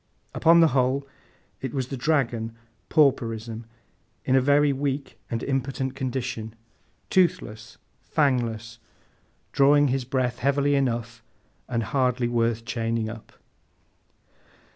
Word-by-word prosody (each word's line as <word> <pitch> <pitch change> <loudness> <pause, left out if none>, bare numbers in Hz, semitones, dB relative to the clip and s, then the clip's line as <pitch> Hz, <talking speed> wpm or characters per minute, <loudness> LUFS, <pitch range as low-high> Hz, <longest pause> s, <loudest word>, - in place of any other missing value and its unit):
Upon 170 +1 +5
the 165 - +6
whole, 130 +2 +1 0.5
it 130 -1 -4
was 130 -2 -2
the 135 - -3
dragon, 120 -5 0 0.3
Pauperism, 115 -6 +1 0.6
in 130 - +3
a 130 - +5
very 145 +1 +4
weak 140 0 -3
and 115 -1 -3
impotent 135 -1 -2
condition; 125 -4 -4 0.6
toothless, 175 - 0 0.3
fangless, 115 -5 0 0.7
drawing 145 +1 +4
his 130 0 0
breath 125 -1 -1
heavily 140 +2 +2
enough, 120 -4 -1 0.5
and 115 -2 0
hardly 125 0 0
worth 115 -1 0
chaining 115 0 -2
up. 115 -1 -12
130 Hz, 110 wpm, -25 LUFS, 115-140 Hz, 0.7 s, the